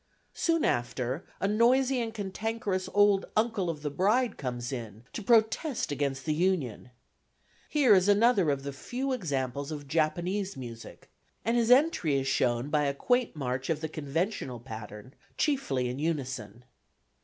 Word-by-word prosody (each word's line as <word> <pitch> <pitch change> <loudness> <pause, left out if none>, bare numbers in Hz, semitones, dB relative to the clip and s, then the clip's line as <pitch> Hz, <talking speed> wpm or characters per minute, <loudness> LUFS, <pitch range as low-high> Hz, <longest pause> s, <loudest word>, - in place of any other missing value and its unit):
Soon 330 -2 +1
after, 125 +4 -1
a 195 - +1
noisy 250 +4 +3
and 225 -1 -3
cantankerous 205 -1 -3
old 205 -1 +4
uncle 215 -5 +1
of 155 -3 -5
the 145 - -2
bride 215 - +2
comes 120 -2 -4
in 115 -4 -6
to - - -4
protest 230 - +2
against 140 -2 -2
the 155 - +1
union. 155 - -1 0.8
Here 275 -7 +5
is 190 0 +4
another 205 -4 +4
of 140 -1 -1
the 140 0 -5
few 255 - -4
examples 140 - -2
of 145 -2 -6
Japanese 175 +6 0
music, 115 -3 -10 0.3
and 230 +2 +2
his 235 -1 +2
entry 250 - +4
is 135 -1 0
shown 125 -1 +1
by 150 -1 +2
a 140 0 0
quaint 245 - +1
march 130 -2 -3
of 160 -2 +1
the 160 0 -4
conventional 150 - -3
pattern 110 +1 -9 0.2
chiefly 145 - 0
in 125 +2 -4
unison. 130 -8 -3
160 Hz, 155 wpm, -29 LUFS, 135-220 Hz, 0.8 s, Here